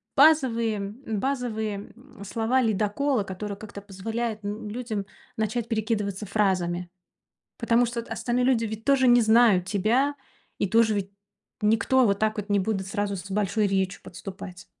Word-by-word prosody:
базовые 250 -8 +4
базовые, 220 0 -3 0.2
м, 235 -4 -14
слова-ледоколы, 225 +2 +1
которые 200 +2 -5
как-то 205 -1 -9
позволяют, 220 +3 -4
н 210 +1 -5
людям 220 -3 -4 0.3
начать 220 +2 -1
перекидываться 215 -3 -2
фразами. 180 -4 0 0.7
Потому 235 +1 +3
что 235 0 -3
от 230 - -12
остальные 240 +2 0
люди 250 -3 +3
ведь 220 0 -5
тоже 275 -2 +4
не 240 0 +7
знают 220 -4 +5
тебя 235 +9 +1 0.4
и 200 - 0
тоже 225 0 +4
ведь 195 -1 -2 0.5
никто 225 +4 +3
вот 200 -2 +2
так 215 0 +1
вот 210 0 -5
не 205 - +3
будут 195 -1 -1
сразу 200 -1 -2
с 185 +2 -8
большой 205 +1 +1
речью 190 0 -1
подступать. 185 0 -9
215 Hz, 145 wpm, -26 LUFS, 200-235 Hz, 0.7 s, не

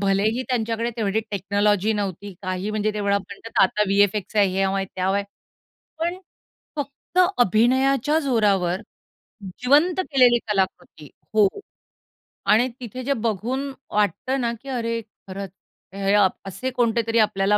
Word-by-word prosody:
भलेही 205 +5 +1
त्यांच्याकडे 230 -1 -1
तेवढी 215 -1 0
टेक्नॉलॉजी 205 +1 +1
नव्हती. 200 -1 -4
काही 185 +2 -3
म्हणजे 215 0 0
तेवढा 200 -1 +1
म्हणतात 200 +4 -4
आता 200 +2 +2
व्ही-एफ-एक्चा 205 +1 +2
हयावं 195 0 +2
आहे, 195 - -1
त्यावं 190 +1 0
आहे, 200 - -1 0.7
पण 340 +3 -1 0.6
फक्त 285 +5 -5 0.2
अभिनयाच्या 260 - +3
जोरावर 205 - +1 0.8
जिवंत 300 +8 +4
केलेली 255 -8 +4
कलाकृती 190 -6 -2 0.3
हो 210 -2 +6 1.0
आणि 235 +4 +5
तिथे 255 +1 -7
जे 280 +3 +1
बघून 235 +4 -2 0.2
वाटतं 210 +6 0
ना, 235 -1 0
की 275 - -10
अरे 230 -2 -2 0.3
खरंच, 195 0 -6 0.4
हे 195 0 0
अ, 205 -2 +6 0.2
असे 195 +8 -4
कोणते 235 -2 +1
तरी 225 0 +2
आपल्याला 210 -1 +3
215 Hz, 130 wpm, -23 LUFS, 195-245 Hz, 1.0 s, हो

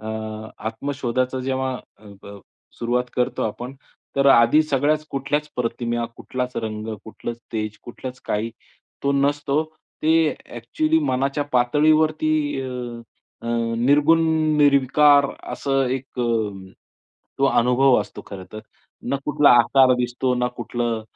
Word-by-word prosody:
अ, 110 - -9 0.6
आत्मशोधाचं 130 +1 -2
जेव्हा 130 0 -2 0.2
अ, 110 - -21 0.2
ब 100 0 -10 0.4
सुरुवात 120 +1 0
करतो 125 -1 0
आपण. 120 +4 -4 0.4
तर 140 0 +3
आधी 120 +5 +6
सगळ्याच 150 +1 +1
कुठल्याच 145 +2 -2
प्रतिमा, 120 0 -2
कुठलाच 125 0 -4
रंग, 110 -1 -4 0.2
कुठलंच 115 +1 -7
तेज, 110 -1 -3
कुठलंच 125 +1 -8
काही 110 +2 -1 0.5
तो 140 - +2
नसतो. 140 +1 +1 0.4
ते 160 0 +4 0.2
ॲक्चुअली 155 +7 0
मनाच्या 135 +3 0
पातळीवरती 155 +5 +3 0.3
अ, - - -5 0.8
अ, - - -7 0.3
निर्गुण, 145 +6 +4 0.4
निर्विकार 145 0 +5 0.3
असं 135 -1 0
एक 130 -1 -8
अ, 105 -5 -2 0.7
तो - - +3
अनुभव 125 +1 +4
असतो 105 - -8
खरं 95 -2 -8
तर. 110 - -7 0.4
ना 140 - -1
कुठला 150 -1 +4
आकार 130 +2 +4
दिसतो 125 +1 -1
ना 125 0 0
कुठलं 120 -2 -2
130 Hz, 120 wpm, -22 LUFS, 120-145 Hz, 0.8 s, आधी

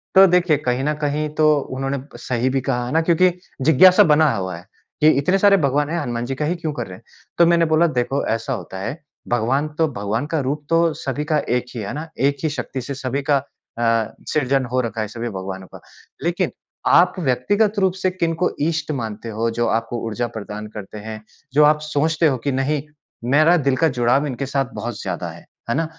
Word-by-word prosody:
तो 190 +1 +9
देखिए, 180 -3 +3
कहीं 130 -2 -1
न 150 +2 +1
कहीं 150 +1 0
तो 155 0 +4 0.3
उन्होंने 135 +1 -1 0.2
सही 125 +1 -1
भी 135 - +1
कहा 125 -2 -1
है 120 - -5
ना, 160 - +4
क्योंकि 170 +2 +4 0.3
जिज्ञासा 160 +6 +7
बना 155 0 +4
हुआ 95 -3 -3
है 85 - -13 0.4
कि 155 - +6
इतने 180 +7 +2
सारे 200 0 +5
भगवान 145 +2 +1
हैं, 170 +1 -1
हनुमान 120 -1 -3
जी 135 +2 -3
का 150 - -2
ही 170 +4 0
क्यों 160 -2 -3
कर 120 -7 -4
रहे 90 - -9
हैं? - - -21 0.3
तो 170 - +6
मैंने 170 0 +4
बोला, 170 +2 +5
"देखो 130 -1 -1
ऐसा 115 +4 -3
होता 95 -5 -6
है, 115 +9 -4 0.3
भगवान 125 +6 +1
तो 160 -1 +3
भगवान 105 +5 -2
का 160 - +1
रूप 145 +2 -2
तो 165 -1 +3
सभी 140 +1 -3
का 155 0 +1
एक 125 0 +1
ही - - -3
है, 100 - -5
है - - -4
ना? 155 +2 -5
एक 140 +1 +2
ही 155 - +2
शक्ति 135 -3 -4
से 140 +3 -5
सभी 135 +1 -2
का 145 - +5 0.4
अ, 115 -2 +1
सृजन 135 -2 +1
हो 130 - +1
रखा 115 -1 -3
है 110 - -2
सभी 115 +3 -5
भगवानों 95 -2 -6
का। - - -10 0.4
लेकिन 175 +2 0 0.4
आप 180 +1 +5
व्यक्तिगत 200 - +1
रूप 190 -2 +2
से 185 - +2
किनको 170 -1 0
ईष्ट 155 -1 -1
मानते 110 0 -5
हो 115 +1 -1
जो 120 - +2
आपको 115 +1 -1
ऊर्जा 120 +2 -2
प्रदान 105 0 -6
करते 105 0 -8
हैं, 110 +1 -7 0.3
जो 150 +2 +6
आप 150 +1 +5
सोचते 155 +2 +1
हो 135 -4 +1
कि 140 - +1
नहीं, 135 +2 0 0.5
मेरा 155 +4 +5
दिल 135 - +4
का 165 - +3
जुड़ाव 125 +5 +2
इनके 140 0 -3
साथ 135 0 0
बहुत 110 +1 -5
ज़्यादा 90 -2 -4
है। 85 +1 -14 0.2
है 115 - +1
ना? 165 +2 +1
140 Hz, 220 wpm, -21 LUFS, 120-155 Hz, 0.5 s, तो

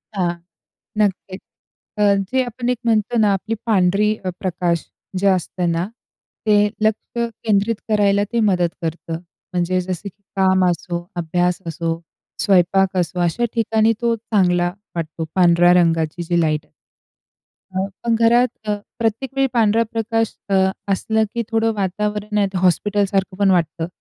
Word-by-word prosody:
हां, 175 -3 +1 0.6
नक्कीच. 195 -2 -1 0.6
अ, - - -1 0.3
जे 260 0 +2
आपण 245 0 -4
एक 250 - +1
म्हणतो 225 +1 +1
ना, 210 -2 +4
आपली 220 +4 -2
पांढरी 210 0 +2
अ, - - 0
प्रकाश 175 -3 -1 0.3
जे 200 - +2
असतं 180 -2 +1
ना, 165 +2 0 0.6
ते 210 0 +5
लक्ष 220 +2 -1 0.3
केंद्रित 215 +1 +2
करायला 205 -1 +3
ते 235 - +2
मदत 180 -2 +2
करतं. 165 0 -4 0.3
म्हणजे 180 +1 +1
जसं 180 +1 -5
की 200 +3 -30
काम 190 -1 +3
असो, 175 0 -3
अभ्यास 175 +1 0
असो, 165 +1 -2 0.4
स्वयंपाक 190 -1 +3
असो, 180 0 -1
अशा 175 +8 +1
ठिकाणी 225 -1 +2
तो 235 -1 +2
चांगला 180 -6 +1 0.2
वाटतो, 160 0 -4
पांढऱ्या 175 -1 +5
रंगाची 165 -1 +2
जी 175 +1 +1
लाईट. 155 -2 0 1.4
पण 235 -1 +2
घरात 235 +2 +4 0.2
अ, 210 - +2 0.2
प्रत्येक 230 +3 -1
वेळी 270 0 +3
पांढरा 230 -1 +3
प्रकाश 225 0 -1 0.2
अ, 195 - +2 0.4
असला 220 +3 +1
की 235 - 0
थोडं 225 0 +2
वातावरण 210 +2 -2
हे 200 - +3
हॉस्पिटलसारखं 195 +1 +1
पण 200 -1 +3
वाटतं. 165 -2 0
195 Hz, 140 wpm, -20 LUFS, 175-220 Hz, 1.4 s, ते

